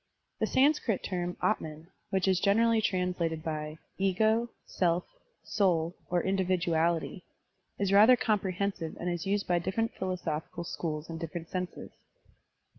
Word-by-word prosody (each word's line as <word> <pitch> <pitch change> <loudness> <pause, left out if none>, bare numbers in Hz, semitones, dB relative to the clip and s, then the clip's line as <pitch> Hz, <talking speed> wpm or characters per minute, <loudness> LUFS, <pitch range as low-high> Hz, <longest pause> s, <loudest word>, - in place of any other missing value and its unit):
The - - +1
Sanskrit 265 -6 +2
term, 175 -1 -3
Atman, 160 -6 -1 0.2
which 190 -1 +1
is 190 -2 +3
generally 225 +3 +3
translated 180 -5 -1
by 155 -1 -4 0.2
"ego," 220 +5 +2 0.2
"self,'* 175 -1 0 0.4
"soul," 175 -5 +1 0.2
or 175 0 +2
"individuality," 175 -2 0 0.5
is 200 -1 0
rather 215 +5 +8
comprehensive 200 -7 -1
and 175 +1 -1
is 175 +2 -3
used 200 +1 +1
by 175 -1 +2
different 225 +6 -1
philo 185 -1 -2
sophical 165 0 -4
schools 155 -2 -4
in 165 -1 -6
different 165 0 -6
senses. 180 -1 -5
180 Hz, 130 wpm, -30 LUFS, 165-200 Hz, 0.5 s, rather